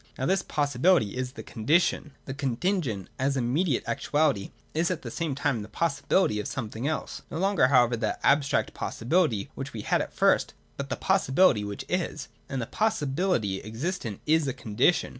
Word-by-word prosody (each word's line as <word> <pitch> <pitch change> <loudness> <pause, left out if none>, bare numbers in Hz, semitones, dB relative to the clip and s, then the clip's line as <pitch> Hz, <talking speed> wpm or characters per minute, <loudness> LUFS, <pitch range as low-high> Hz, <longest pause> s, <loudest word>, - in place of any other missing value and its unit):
Now 130 - -2
this 190 +3 +2
possibility 145 - +2
is 130 0 -3
the - - -8
Condition. 150 +4 +1
The 135 - -5
Contingent, 135 - -1
as 135 +1 +1
the 130 - 0
immediate 135 +4 +1
actuality, 135 -1 0 0.2
is 165 +2 +1
at 180 -4 -3
the 120 - -6
same 160 -1 -2
time 140 -4 0
the 105 - -7
possibility 140 - +1
of 105 - -3
somewhat 110 -3 -5
else, 155 - -3
— - - -36
no - - -5
longer 190 -6 +3
however 125 -3 +4
that 110 -1 -2
abstract 140 0 +2
possibihty 120 - 0
which - - -6
we - - -5
had - - +1
at - - -5
first, - - +2 0.2
but 140 0 -5
the - - -2
possi 190 -6 +1
bility 135 - +4
■which 100 0 -5
25. - - -2 0.2
And 130 -3 -2
a - - -4
possibility 145 - 0
existent 115 - -4
is 155 -1 +3
a 135 - -1
Condition. 130 +6 +1
140 Hz, 185 wpm, -27 LUFS, 115-165 Hz, 0.2 s, however